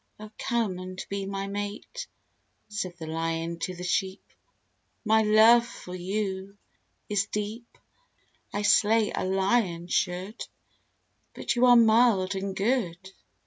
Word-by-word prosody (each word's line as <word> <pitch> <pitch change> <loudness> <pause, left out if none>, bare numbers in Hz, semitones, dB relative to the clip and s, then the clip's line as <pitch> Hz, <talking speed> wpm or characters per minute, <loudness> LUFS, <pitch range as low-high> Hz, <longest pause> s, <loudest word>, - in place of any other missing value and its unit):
"O 215 0 -10
come 225 -6 -1
and 185 0 -7
be 195 -1 -3
my 195 0 -3
mate!" 205 - -5 0.6
said 190 -4 -4
the 165 - -7
Lion 165 +1 -3
to 180 +2 -4
the 180 - -8
Sheep; 190 +1 -1 0.8
"My 220 +1 +4
love 220 +2 +6
for 210 -6 -10
you 190 +1 -4 0.5
is 200 -1 0
deep! 210 +3 -5 0.7
I 205 - -2
slay, 215 +1 +4
a - - -2
Lion 190 -2 +1
should, 185 +4 -2 0.9
But - - -2
you 245 +1 +4
are 245 - +8
mild 225 -4 +4
and 195 0 -4
good!" 195 -4 -1
200 Hz, 130 wpm, -27 LUFS, 185-220 Hz, 0.9 s, are